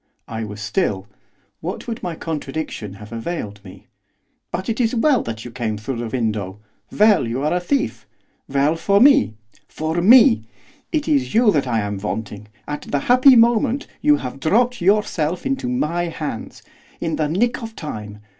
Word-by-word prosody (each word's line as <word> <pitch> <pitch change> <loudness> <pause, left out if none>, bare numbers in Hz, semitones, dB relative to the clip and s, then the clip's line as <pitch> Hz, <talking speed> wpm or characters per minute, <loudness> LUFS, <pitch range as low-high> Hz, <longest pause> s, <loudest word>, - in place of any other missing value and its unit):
I 110 0 -4
was 105 -1 -7
still, 105 - -1 0.5
what 180 +8 -6
would 230 -2 -4
my 175 -2 -4
contradiction 150 - -5
have 105 +2 -12
availed 115 -5 -5
me? 95 -2 -13 0.7
'But 185 +2 -4
it 230 - -2
is 230 +1 +1
well 260 +2 +3
that 115 0 -6
you 120 - -7
came 115 -3 -3
through 115 +4 -5
the 120 0 -3
window, 110 -5 -2 0.3
well 210 - +4
you 125 +4 -3
are 150 - +1
a 180 - +1
thief, 275 +10 -2 0.4
well 140 +3 +2
for 200 +4 +2
me! 275 - +5 0.3
for 160 +2 -2
me! 185 - +6 0.5
It 305 -3 -1
is 280 -7 +1
you 230 -2 +5
that 145 -7 0
I 115 -3 +1
am 100 -1 -3
wanting, 105 0 -5 0.2
at 150 0 -4
the 140 - -2
happy 255 +2 +6
moment 235 +3 +3 0.2
you 295 0 +5
have 130 - -6
dropped 240 - +1
yourself 180 -4 +1
into 270 -2 -1
my 175 -9 0
hands, 155 -8 -6 0.4
in 165 -1 -2
the 155 - 0
nick 235 - 0
of 225 -1 -7
time. 105 -8 -7
160 Hz, 175 wpm, -21 LUFS, -, 0.7 s, me